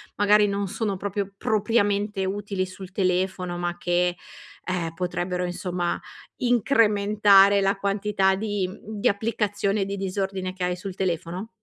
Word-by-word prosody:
magari 205 Hz, +1 st, +4 dB
non 200 Hz, 0 st, -1 dB
sono 205 Hz, 0 st, -2 dB
proprio 200 Hz, 0 st, -3 dB
propriamente 205 Hz, -2 st, +1 dB
utili 195 Hz, 0 st, -2 dB
sul 185 Hz, 0 st, -10 dB
telefono 185 Hz, -1 st, 0 dB
ma 175 Hz, 0 st, -2 dB
che, 175 Hz, 0 st, +1 dB, 0.5 s
ehm, 175 Hz, -3 st, -2 dB
potrebbero 180 Hz, 0 st, -2 dB
insomma 175 Hz, 0 st, -2 dB, 0.4 s
incrementare 210 Hz, -4 st, +4 dB
la 195 Hz, +1 st, +2 dB
quantità 195 Hz, -1 st, +1 dB
di 205 Hz, -1 st, -1 dB
mhmm, 205 Hz, +3 st, -9 dB
di -, -, +2 dB
applicazione, 205 Hz, -1 st, 0 dB
di 200 Hz, +1 st, -4 dB
disordine 190 Hz, -1 st, -3 dB
che 185 Hz, -1 st, -5 dB
hai 180 Hz, 0 st, 0 dB
sul 185 Hz, +1 st, -7 dB
telefono? 185 Hz, +2 st, -3 dB
195 Hz, 135 wpm, -25 LUFS, 185-205 Hz, 0.5 s, magari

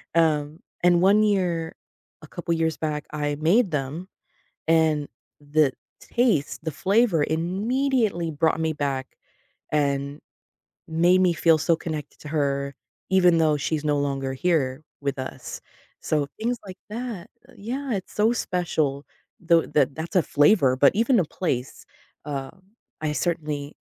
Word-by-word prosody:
Um, 155 Hz, -2 st, +2 dB, 0.2 s
and 175 Hz, -1 st, +5 dB
one 200 Hz, +3 st, +5 dB
year, 180 Hz, -6 st, 0 dB, 0.5 s
a -, -, -10 dB
couple 170 Hz, +1 st, -3 dB
years 160 Hz, -1 st, 0 dB
back, 150 Hz, -2 st, -3 dB
I 145 Hz, -1 st, -1 dB
made 190 Hz, +5 st, +3 dB
them, 150 Hz, +6 st, -3 dB, 0.6 s
and 160 Hz, -3 st, +3 dB, 0.3 s
the 145 Hz, -1 st, +2 dB, 0.3 s
taste 220 Hz, -, 0 dB
the 160 Hz, -, -2 dB
flavor 195 Hz, -, +2 dB
immediately 200 Hz, -, 0 dB
brought 160 Hz, +1 st, +1 dB
me 160 Hz, -1 st, 0 dB
back, 140 Hz, -3 st, -2 dB, 0.6 s
and 140 Hz, -1 st, 0 dB, 0.7 s
made 175 Hz, +3 st, +4 dB
me 180 Hz, -2 st, +4 dB
feel 165 Hz, 0 st, +4 dB
so 165 Hz, +2 st, +2 dB
connected 155 Hz, -3 st, -6 dB
to 150 Hz, -, -9 dB
her, 140 Hz, -2 st, -1 dB, 0.4 s
even 180 Hz, -3 st, +5 dB
though 155 Hz, -2 st, +3 dB
she's 150 Hz, +1 st, -2 dB
no 150 Hz, -1 st, +2 dB
longer 135 Hz, -1 st, -1 dB
here 140 Hz, -3 st, 0 dB, 0.2 s
with 140 Hz, -1 st, -2 dB
us. 130 Hz, -, -7 dB, 0.4 s
So, 150 Hz, -2 st, 0 dB
things 240 Hz, +2 st, -1 dB
like 185 Hz, -1 st, -9 dB
that 225 Hz, -5 st, -5 dB, 0.2 s
uh, -, -, -17 dB
yeah, 255 Hz, +6 st, -4 dB
it's 190 Hz, -2 st, -5 dB
so 215 Hz, +2 st, +3 dB
special. 160 Hz, -, -1 dB, 0.3 s
Though, 170 Hz, -1 st, +4 dB
tha 145 Hz, -3 st, +2 dB
that's 160 Hz, +6 st, -5 dB
a 180 Hz, -, +5 dB
flavor, 145 Hz, -3 st, +4 dB
but 140 Hz, +1 st, +5 dB
even 230 Hz, +1 st, +3 dB
a 175 Hz, -, +1 dB
place. 135 Hz, -6 st, -4 dB, 0.4 s
Uh, 135 Hz, -3 st, -4 dB, 0.5 s
I 150 Hz, -1 st, 0 dB
certainly 150 Hz, -3 st, -2 dB
160 Hz, 145 wpm, -24 LUFS, 145-185 Hz, 0.7 s, and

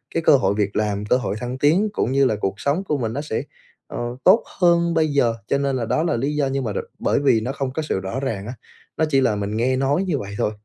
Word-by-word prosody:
cái 165 Hz, -, 0 dB
cơ 145 Hz, -, +6 dB
hội 95 Hz, -4 st, +1 dB
việc 100 Hz, -1 st, -1 dB
làm, 105 Hz, -1 st, -1 dB
cơ 125 Hz, -, +3 dB
hội 125 Hz, -6 st, -3 dB
thăng 125 Hz, +2 st, -4 dB
tiến 165 Hz, +10 st, +3 dB
cũng -, -, 0 dB
như 135 Hz, +1 st, +3 dB
là 110 Hz, -, +2 dB
cuộc 95 Hz, -, 0 dB
sống 150 Hz, +7 st, 0 dB
của 150 Hz, -6 st, -1 dB
mình 115 Hz, -4 st, -2 dB
nó 140 Hz, -, -3 dB
sẽ, 145 Hz, -7 st, -3 dB, 0.4 s
ờ, -, -, -6 dB, 0.2 s
tốt 195 Hz, +5 st, +6 dB, 0.2 s
hơn 170 Hz, -1 st, +3 dB
bây 160 Hz, -1 st, +2 dB
giờ. 140 Hz, -6 st, +2 dB
Cho 140 Hz, -, +1 dB
nên 140 Hz, -1 st, 0 dB
là 120 Hz, -, -2 dB
đó 155 Hz, -, 0 dB
là 165 Hz, -8 st, 0 dB
lý 140 Hz, +5 st, -1 dB
do 145 Hz, -2 st, +1 dB
nhưng 135 Hz, 0 st, -2 dB
mà 110 Hz, -4 st, -3 dB
rồi -, -, -4 dB
bởi -, -, +1 dB
vì 135 Hz, -6 st, +3 dB
nó 125 Hz, +4 st, -2 dB
không 135 Hz, -1 st, -3 dB
có 160 Hz, -, -2 dB
sự 150 Hz, -, -2 dB
rõ 95 Hz, +7 st, -4 dB
ràng 110 Hz, -7 st, -3 dB
á, 120 Hz, -, -5 dB, 0.4 s
nó 160 Hz, -, +2 dB
chỉ 135 Hz, -2 st, +3 dB
là 115 Hz, -5 st, +2 dB
mình 105 Hz, +1 st, -3 dB
nghe 130 Hz, +3 st, +1 dB
nói 135 Hz, +7 st, +1 dB
như 180 Hz, -6 st, -1 dB
vậy 100 Hz, -2 st, -7 dB
thôi. 105 Hz, -, 0 dB
135 Hz, 285 wpm, -22 LUFS, 110-150 Hz, 0.4 s, cơ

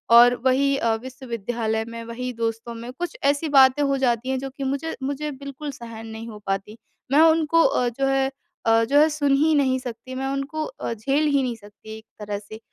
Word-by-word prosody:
और 245 Hz, +1 st, +8 dB
वही 275 Hz, +2 st, +3 dB
अ, 230 Hz, -4 st, +1 dB
विश्वविद्यालय 230 Hz, -2 st, -3 dB
में 230 Hz, 0 st, -7 dB
वही 250 Hz, +2 st, -4 dB
दोस्तों 230 Hz, 0 st, -3 dB
में 235 Hz, +2 st, -7 dB
कुछ 350 Hz, -, -5 dB
ऐसे 285 Hz, +3 st, +2 dB
बातें 270 Hz, 0 st, +6 dB
हो 275 Hz, -1 st, +1 dB
जाती 250 Hz, -1 st, 0 dB
हैं 265 Hz, 0 st, 0 dB
जो 270 Hz, +1 st, -5 dB
कि 275 Hz, -, -4 dB
मुझे 280 Hz, +4 st, -2 dB
मुझे 285 Hz, +2 st, -2 dB
बिल्कुल 280 Hz, +2 st, -7 dB
सहन 230 Hz, -3 st, -9 dB
नहीं 220 Hz, +1 st, -7 dB
हो 210 Hz, -2 st, -9 dB
पाती। 195 Hz, +3 st, -3 dB, 0.3 s
मैं 290 Hz, +3 st, +6 dB
उनको 325 Hz, 0 st, +4 dB
अ, 245 Hz, -, +2 dB
जो 270 Hz, +3 st, -2 dB
है 270 Hz, 0 st, +1 dB, 0.4 s
अ, 225 Hz, 0 st, +5 dB
जो 280 Hz, +6 st, +3 dB
है 310 Hz, +1 st, +6 dB
सुन 290 Hz, -2 st, +1 dB
ही 310 Hz, +2 st, +3 dB
नहीं 265 Hz, -3 st, +2 dB
सकती। 255 Hz, +1 st, -8 dB
मैं 265 Hz, +1 st, -2 dB
उनको 275 Hz, +3 st, -3 dB
अ, -, -, -5 dB
झेल 270 Hz, +7 st, 0 dB
ही 280 Hz, -2 st, +3 dB
नहीं 245 Hz, -2 st, -2 dB
सकती 220 Hz, 0 st, -12 dB
एक 220 Hz, -, -15 dB
तरह 205 Hz, -1 st, -4 dB
से। 215 Hz, +1 st, -11 dB
260 Hz, 210 wpm, -23 LUFS, 230-280 Hz, 0.4 s, और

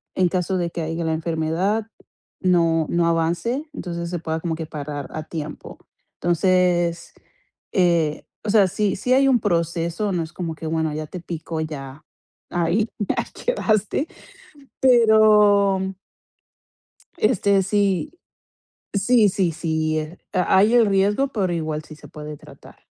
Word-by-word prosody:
en 185 Hz, -1 st, +3 dB
caso 185 Hz, +1 st, -1 dB
de 170 Hz, -1 st, -1 dB
que 170 Hz, -, -5 dB
haya, 165 Hz, +1 st, -3 dB
la 160 Hz, 0 st, 0 dB
enfermedad, 165 Hz, +7 st, -1 dB, 0.5 s
no 165 Hz, -4 st, +2 dB
no 170 Hz, -1 st, +2 dB
avance, 170 Hz, -, 0 dB
entonces, 170 Hz, -, -5 dB
se 175 Hz, -2 st, -3 dB
pueda 160 Hz, -1 st, -3 dB
como 165 Hz, -1 st, -2 dB
que 160 Hz, -, -5 dB
parar 145 Hz, -2 st, -6 dB
a 155 Hz, -, -4 dB
tiempo. 155 Hz, -2 st, -7 dB, 0.4 s
Entonces, 175 Hz, -1 st, +1 dB, 0.6 s
eh 170 Hz, -5 st, +2 dB, 0.2 s
o -, -, -2 dB
sea, 200 Hz, -3 st, +5 dB
sí 200 Hz, +1 st, 0 dB
sí 250 Hz, +6 st, +1 dB
hay 270 Hz, +1 st, +4 dB
un 250 Hz, -2 st, +4 dB
proceso, 170 Hz, 0 st, -1 dB
no 170 Hz, -2 st, 0 dB
es 160 Hz, -, -10 dB
como 170 Hz, -2 st, -4 dB
que, 160 Hz, -, -7 dB
bueno, 160 Hz, -1 st, -1 dB
ya 155 Hz, 0 st, -4 dB
te 180 Hz, -, -7 dB
picó, 165 Hz, -1 st, -5 dB
ya 145 Hz, -2 st, -7 dB, 0.5 s
ahí, 180 Hz, +6 st, 0 dB
ya 205 Hz, -, -1 dB, 0.2 s
quedaste, 225 Hz, -, 0 dB, 0.7 s
pero 210 Hz, -5 st, +5 dB, 1.2 s
este, 200 Hz, -3 st, +3 dB
sí. 200 Hz, -, 0 dB, 0.7 s
Sí, 215 Hz, +2 st, +4 dB
sí, 185 Hz, -4 st, 0 dB
sí, 155 Hz, -1 st, -1 dB
eh, 155 Hz, +4 st, -8 dB
ha 185 Hz, +1 st, +2 dB
hay 210 Hz, +5 st, +4 dB
el 235 Hz, -2 st, +6 dB
riesgo, 205 Hz, +7 st, +2 dB
pero 195 Hz, -8 st, -1 dB
igual 155 Hz, -2 st, -3 dB
sí 155 Hz, -, -11 dB
se -, -, -14 dB
puede 150 Hz, 0 st, -8 dB
tratar. -, -, -16 dB
175 Hz, 145 wpm, -22 LUFS, 160-205 Hz, 1.2 s, el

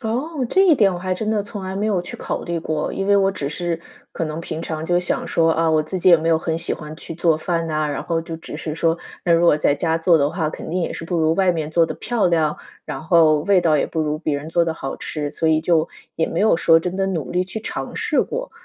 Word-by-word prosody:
哦， 260 Hz, +5 st, -2 dB
这 380 Hz, -, +4 dB
一 325 Hz, -, +6 dB
点 200 Hz, -6 st, +3 dB
我 175 Hz, -, -4 dB
还 185 Hz, 0 st, -2 dB
真 215 Hz, +3 st, -2 dB
的 210 Hz, -2 st, +1 dB
从 205 Hz, -2 st, -7 dB
来 190 Hz, 0 st, -5 dB
没 210 Hz, +2 st, -1 dB
有 200 Hz, -4 st, +1 dB
去 175 Hz, -, -8 dB
考 -, -, -4 dB
虑 170 Hz, -1 st, -3 dB
过， 155 Hz, -1 st, -2 dB
因 195 Hz, -, -3 dB
为 200 Hz, 0 st, +4 dB
我 195 Hz, 0 st, +3 dB
只 140 Hz, -7 st, -4 dB
是 170 Hz, +2 st, -2 dB, 0.3 s
可 165 Hz, -, -3 dB
能 155 Hz, +1 st, -4 dB
平 160 Hz, -1 st, -5 dB
常 160 Hz, -1 st, -4 dB
就 175 Hz, +1 st, +2 dB
想 180 Hz, -, -1 dB
说， 165 Hz, -1 st, +2 dB
啊， 165 Hz, 0 st, +1 dB
我 155 Hz, -1 st, +3 dB
自 170 Hz, +5 st, -5 dB
己 185 Hz, -, +3 dB
也 170 Hz, -, +8 dB
没 160 Hz, +1 st, -2 dB
有 165 Hz, -, +4 dB
很 160 Hz, 0 st, -2 dB
喜 -, -, -1 dB
欢 155 Hz, 0 st, -9 dB
去 165 Hz, -, -8 dB
做 165 Hz, -1 st, +2 dB
饭 165 Hz, +1 st, -2 dB
呐， 155 Hz, -1 st, 0 dB
然 145 Hz, -, -3 dB
后 165 Hz, -1 st, -1 dB
就 165 Hz, 0 st, -7 dB
只 155 Hz, -, -8 dB
是 155 Hz, -1 st, -5 dB
说， 165 Hz, +1 st, +1 dB, 0.3 s
那 170 Hz, -, +3 dB
如 170 Hz, +1 st, +4 dB
果 150 Hz, -, +5 dB
在 145 Hz, -1 st, +2 dB
家 165 Hz, 0 st, 0 dB
做 165 Hz, -1 st, +4 dB
的 140 Hz, 0 st, +2 dB
话， 165 Hz, -3 st, -2 dB
肯 -, -, -8 dB
定 180 Hz, +3 st, -1 dB
也 -, -, -2 dB
是 -, -, -6 dB
不 175 Hz, 0 st, -2 dB
如 160 Hz, 0 st, +2 dB
外 190 Hz, -1 st, +3 dB
面 155 Hz, -2 st, -3 dB
做 165 Hz, 0 st, +3 dB
得 -, -, -5 dB
漂 240 Hz, -5 st, 0 dB
亮， 160 Hz, -3 st, +1 dB, 0.3 s
然 150 Hz, -3 st, -5 dB
后 160 Hz, -3 st, +4 dB
味 190 Hz, +2 st, +3 dB
道 160 Hz, -3 st, +3 dB
也 -, -, +1 dB
不 160 Hz, -, -3 dB
如 150 Hz, 0 st, -1 dB
别 155 Hz, -3 st, -1 dB
人 150 Hz, +3 st, -6 dB
做 170 Hz, +1 st, +2 dB
得 165 Hz, -1 st, -2 dB
好 135 Hz, -4 st, -5 dB
吃， 150 Hz, -2 st, -4 dB
所 160 Hz, -, -1 dB
以 155 Hz, 0 st, +3 dB
就 165 Hz, -1 st, +2 dB, 0.3 s
也 160 Hz, -, +1 dB
没 165 Hz, -, -2 dB
有 215 Hz, -5 st, +4 dB
说 165 Hz, -1 st, +4 dB
真 180 Hz, +2 st, -4 dB
的 195 Hz, 0 st, 0 dB
努 165 Hz, -9 st, -3 dB
力 180 Hz, +1 st, 0 dB
去 215 Hz, +4 st, -6 dB
尝 -, -, -5 dB
试 -, -, +1 dB
过。 -, -, -5 dB
165 Hz, 310 characters per minute, -21 LUFS, 155-185 Hz, 0.3 s, 也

